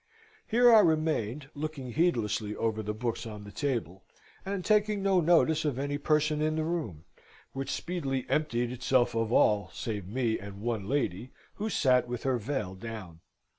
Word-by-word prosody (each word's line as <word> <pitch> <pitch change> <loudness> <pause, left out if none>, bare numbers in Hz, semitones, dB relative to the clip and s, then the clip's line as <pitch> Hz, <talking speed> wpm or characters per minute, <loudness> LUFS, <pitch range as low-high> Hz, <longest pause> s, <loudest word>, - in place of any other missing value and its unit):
Here 240 +1 +6
I 220 - +9
remained, 155 - +1
looking 145 -4 -5
heedlessly 115 - 0
over 110 -1 -1
the 105 0 -3
books 115 +1 -3
on 105 -2 -8
the 100 - -10
table 115 - -3 0.4
and 195 -2 -4
taking 210 -1 +2
no 190 -2 +3
notice 160 -1 +3
of 145 -5 -1
any 145 +1 -2
person 150 0 +1
in 155 0 +1
the 160 - 0
room, 155 - -3 0.5
which 135 0 -4
speedily 135 -5 -2
emptied 120 -6 0
itself 125 0 +1
of 115 -1 -1
all, 105 -5 +3
save 105 -7 -4
me 115 +1 0
and 100 0 -9
one 110 -2 -2
lady 130 -4 -1 0.2
who 215 +2 -2
sate 125 - +3
with 120 -1 -5
her 130 -2 +1
veil 110 -5 -3
down. 95 -5 -8
130 Hz, 170 wpm, -29 LUFS, 110-155 Hz, 0.5 s, I